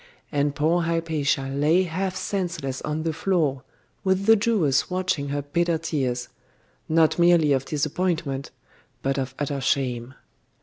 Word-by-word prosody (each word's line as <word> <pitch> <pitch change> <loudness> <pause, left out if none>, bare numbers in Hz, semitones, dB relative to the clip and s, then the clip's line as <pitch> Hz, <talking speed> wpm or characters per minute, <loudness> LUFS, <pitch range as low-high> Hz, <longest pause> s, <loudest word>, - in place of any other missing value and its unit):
And 145 -1 0
poor 165 +4 +2
Hypatia 160 -4 0
lay 150 +7 +3
half 185 +2 -2
senseless 175 -8 -3
on 150 +1 -3
the 165 -1 -1
floor, 160 -6 0 0.4
with 190 0 +1
the 225 +1 +7
Jewess 200 - +2
watching 180 -6 -1
her 145 0 -2
bitter 170 +3 0
tears 130 -7 -2 0.6
not 160 +1 +3
merely 170 -4 +5
of 135 0 0
disappointment, 155 -2 -1 0.5
but 135 0 0
of 130 0 -4
utter 145 -1 -2
shame. 130 -2 -1
155 Hz, 135 wpm, -24 LUFS, 140-175 Hz, 0.6 s, the